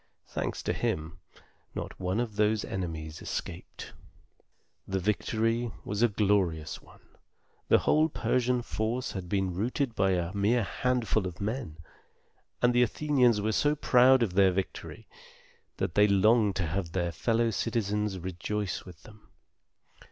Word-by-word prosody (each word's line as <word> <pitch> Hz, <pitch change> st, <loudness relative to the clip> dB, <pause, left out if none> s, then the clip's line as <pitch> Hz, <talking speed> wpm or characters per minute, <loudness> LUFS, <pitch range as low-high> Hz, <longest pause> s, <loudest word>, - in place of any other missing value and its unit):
Thanks -, -, -4 dB
to -, -, 0 dB
him, 80 Hz, +1 st, -3 dB, 0.6 s
not -, -, -6 dB
one 95 Hz, +3 st, -1 dB
of 115 Hz, -3 st, -2 dB
those 105 Hz, 0 st, +2 dB
enemies 80 Hz, -4 st, -5 dB
escaped. -, -, -6 dB, 0.9 s
The 95 Hz, -, -1 dB
victory 115 Hz, +4 st, 0 dB
was 105 Hz, +1 st, -2 dB
a 120 Hz, -, +6 dB
glorious 95 Hz, -7 st, 0 dB
one. -, -, -19 dB, 0.7 s
The -, -, +6 dB
whole 155 Hz, +1 st, +3 dB
Persian 125 Hz, -3 st, 0 dB
force 115 Hz, +3 st, -2 dB
had 95 Hz, -3 st, -6 dB
been 95 Hz, -2 st, 0 dB
routed 120 Hz, +6 st, -1 dB
by 95 Hz, -3 st, +2 dB
a 90 Hz, 0 st, -1 dB
mere 105 Hz, +4 st, +2 dB
handful 115 Hz, -2 st, 0 dB
of 85 Hz, -2 st, -9 dB
men; 105 Hz, -, -4 dB, 0.9 s
and 120 Hz, 0 st, +5 dB
the 120 Hz, -, +4 dB
Athenians 125 Hz, -3 st, +2 dB
were 110 Hz, +2 st, 0 dB
so 145 Hz, +7 st, +2 dB
proud 130 Hz, -2 st, +5 dB
of 100 Hz, -6 st, -1 dB
their 95 Hz, 0 st, +5 dB
victory, 95 Hz, +1 st, -5 dB, 0.7 s
that -, -, -2 dB
they 105 Hz, +2 st, +5 dB
longed 105 Hz, +1 st, +4 dB
to 95 Hz, -, 0 dB
have 85 Hz, +1 st, -3 dB
their 85 Hz, -2 st, 0 dB
fellow 115 Hz, +8 st, +1 dB
citizens 105 Hz, -3 st, -1 dB
rejoice 95 Hz, +2 st, -3 dB
with 90 Hz, -5 st, -13 dB
them. 110 Hz, -1 st, -17 dB
105 Hz, 145 wpm, -29 LUFS, 95-120 Hz, 0.9 s, a